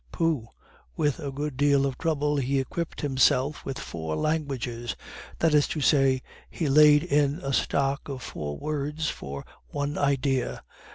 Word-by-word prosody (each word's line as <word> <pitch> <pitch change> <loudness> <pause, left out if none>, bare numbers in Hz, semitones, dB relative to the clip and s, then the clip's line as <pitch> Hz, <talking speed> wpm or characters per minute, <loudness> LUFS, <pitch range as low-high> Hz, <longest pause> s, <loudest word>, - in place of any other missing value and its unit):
Pooh! 160 -9 0 0.5
with 145 -1 +1
a 145 -3 -4
good 145 0 -4
deal 140 -1 +4
of 135 -2 -1
trouble 150 0 0
he 135 0 +1
equipped 165 +5 -4
himself 135 0 +2
with 135 -1 -4
four 80 -2 -4
languages 130 - -2 0.4
that 165 -2 +2
is 150 -1 +5
to 155 - -3
say, 135 -2 +3 0.3
he 160 - -2
laid 150 +1 +7
in 145 -2 +2
a 135 - -2
stock 140 +2 0
of 130 -2 -5
four 75 -1 -5
words 150 +1 -2
for 70 0 -7 0.2
one 145 0 -2
idea. 135 -2 0
140 Hz, 155 wpm, -27 LUFS, 130-150 Hz, 0.5 s, laid